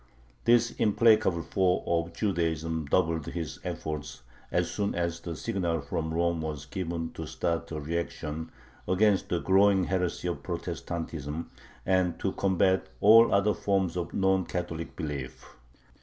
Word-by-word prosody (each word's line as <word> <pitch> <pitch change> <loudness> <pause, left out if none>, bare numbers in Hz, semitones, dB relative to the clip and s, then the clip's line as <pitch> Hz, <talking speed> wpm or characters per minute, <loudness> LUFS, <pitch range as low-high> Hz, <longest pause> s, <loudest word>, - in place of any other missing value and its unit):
This 120 0 +4
implacable 105 -5 +3
foe 95 -2 +1
of 85 0 0
Judaism 80 -5 -1
doubled 80 -1 +1
his 85 -2 -5
efforts 75 -4 -5 0.3
as 90 -1 +1
soon 100 +3 -1
as 85 -1 -1
the 85 0 -6
signal 90 -7 -1
from 80 +3 -3
Rome 85 0 0
was 75 -2 -4
given 85 0 -4
to - - -6
start 85 0 -2
a 80 - -3
reaction 80 0 -4 0.4
against 100 +1 +3
the 90 - +1
growing 95 0 +4
heresy 90 -1 -1
of - - -3
Protestantism 80 -2 -5 0.3
and 90 -2 +2
to 95 - 0
combat 95 -1 +2
all 115 +3 +7
other 100 +1 +3
forms 95 -4 0
of 85 -1 -3
non 95 -1 +2
Catholic 85 -2 -4
belief. 65 -4 -5
85 Hz, 140 wpm, -28 LUFS, 80-95 Hz, 0.4 s, all